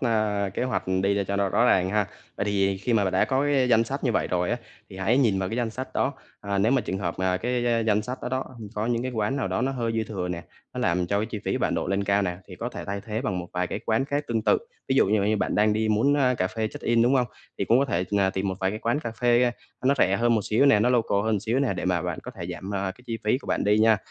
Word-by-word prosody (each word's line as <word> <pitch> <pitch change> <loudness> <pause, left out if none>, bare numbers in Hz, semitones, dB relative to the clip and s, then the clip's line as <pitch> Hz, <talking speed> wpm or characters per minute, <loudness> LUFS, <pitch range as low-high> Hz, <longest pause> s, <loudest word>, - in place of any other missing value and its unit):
à, 110 -5 +1
kế - - -1
hoạch 130 0 -1 0.2
đi 100 0 +1
cho 100 - 0
nó 100 -1 +1
rõ 115 +5 +2
ràng 95 -4 +3
ha. 105 -1 +1 0.3
Vậy - - -1
thì 100 -1 +1
khi 115 +5 -2
mà 105 -3 +3
bạn 95 - -1
đã - - +3
có 135 +1 +1
cái 140 -3 +2
danh 115 -1 +4
sách 135 +4 -4
như 125 - +2
vậy - - +1
rồi 90 -1 0
á, 120 - +1 0.3
thì 95 - -10
hãy 110 +7 +2
nhìn 110 -8 +3
vào 95 -1 -1
cái 115 - -3
danh 120 -2 -1
sách 130 +4 -6
đó, 140 - +1 0.3
à, 100 -1 -2
nếu 110 +5 +3
mà 135 - +3
trường 95 - -3
hợp 85 -4 -2
mà 95 0 +1
cái 120 +2 0
danh 105 -1 +3
sách 125 +3 -5
đó - - -2
đó 130 +1 -1 0.3
có 105 +1 -1
những 120 0 0
cái 130 - -2
quán 110 +3 -1
nào 130 -8 -1
đó 95 +4 -1
nó 135 +1 0
hơi 115 -3 -2
dư 110 -1 0
thừa 95 -4 -4
nè, 85 -1 -4 0.3
nó - - -3
làm 90 +1 +1
cho 100 +3 0
cái 110 - -1
chi 115 -2 -5
phí - - 0
bạn - - 0
đội 95 - -2
lên 100 0 0
cao 100 0 +2
nè, 90 -2 -2
thì 90 - -9
có 120 - -3
thể - - -7
thay 100 0 -4
thế 110 +1 -2
bằng 95 -9 -1
một 90 -1 -6
vài 90 0 0
cái - - -4
quán 110 +4 +2
khác 145 +1 -2
tương 115 -2 0
tự. - - +3 0.3
Ví 130 - +2
dụ 135 - +5
như 105 0 +2
như 105 +2 +2
bạn - - -1
đang 105 +1 +3
đi 110 +1 0
muốn, 115 +7 +3
ơ, 130 -3 +3
cà 95 - +2
phê 110 +1 -2
check-in, 115 +1 +1
đúng 125 +3 +3
hông? 125 -2 +3 0.3
Thì - - 0
cũng 120 +3 +4
có 140 - +3
thể, 95 -9 -1
ờ, 95 -1 +3
tìm 95 +1 -2
một 95 - -1
vài 95 0 +1
cái 105 - -4
quán 120 +6 0
cà 120 - -4
phê, 120 0 +4 0.4
ờ, - - -2
nó 140 - +5
rẻ 95 -2 +3
hơn 120 0 +3
một 110 - +2
xíu 115 +6 +3
nè, 105 -7 +5
nó 120 - +3
local 115 -5 +2
hơn 110 -3 +1
xíu 115 +4 0
nè, 135 -6 +1
để 90 - -4
mà 90 -2 +1
bạn - - -3
có - - -7
thể - - -7
giảm, 95 - -7
ờ, 95 -1 -2
cái 125 - -20
chi 115 -1 -3
phí 110 +4 +2
của - - -15
bạn - - 0
đi 105 +1 +3
nha. 110 0 +5
110 Hz, 320 wpm, -25 LUFS, 100-120 Hz, 0.4 s, dụ